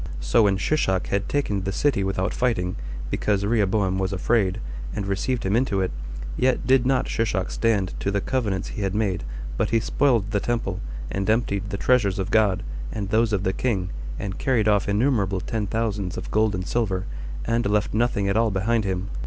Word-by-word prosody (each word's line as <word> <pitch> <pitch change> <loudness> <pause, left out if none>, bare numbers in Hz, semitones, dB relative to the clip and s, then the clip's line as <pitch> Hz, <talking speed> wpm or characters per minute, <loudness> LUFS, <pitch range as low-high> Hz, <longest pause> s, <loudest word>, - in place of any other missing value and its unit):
So 70 - +3
when 100 -3 +3
Shishak 95 -6 0
had 100 0 -1
taken 105 -9 0
the 95 +1 -2
city 120 0 +1
without 95 0 -1
fighting, 110 -8 0 0.4
because 100 -1 +1
Rehoboam 100 -3 +1
was 95 0 0
afraid, 95 0 +1 0.4
and 100 - -2
received 110 +6 -1
him 95 +2 +2
into 115 -5 +1
it, 95 -1 0 0.4
yet 130 -1 +1
did 130 -1 +4
not 135 -1 +2
Shishak 100 -5 -1
stand 105 -5 +1
to - - -1
the 100 0 +1
covenants 105 -5 -1
he - - -5
had 95 0 -1
made, 100 - 0 0.3
but - - +1
he 115 - +3
spoiled 115 -3 +1
the 105 - +2
temple, 105 -5 -2 0.3
and 95 +1 -1
emptied 105 -3 +1
the 100 - -3
treasures 105 -5 +2
of 95 +1 -2
God, 105 -4 +3 0.3
and 100 -3 -3
those 110 +1 +3
of 100 -2 0
the 95 - +1
king, 95 -7 -1 0.3
and 100 -1 -4
carried 120 -6 +2
off 105 -1 +3
innumerable 105 -3 +2
ten 105 +3 -2
thousands 105 -4 -2
of 90 - -6
gold 110 -1 +2
and 90 0 -3
silver, 100 -4 -1 0.4
and 115 -2 +1
left 105 0 +1
nothing 110 -3 +1
at 100 - +1
all 115 0 +3
behind 105 +3 +1
him. 95 0 -2
105 Hz, 195 wpm, -24 LUFS, 95-115 Hz, 0.4 s, did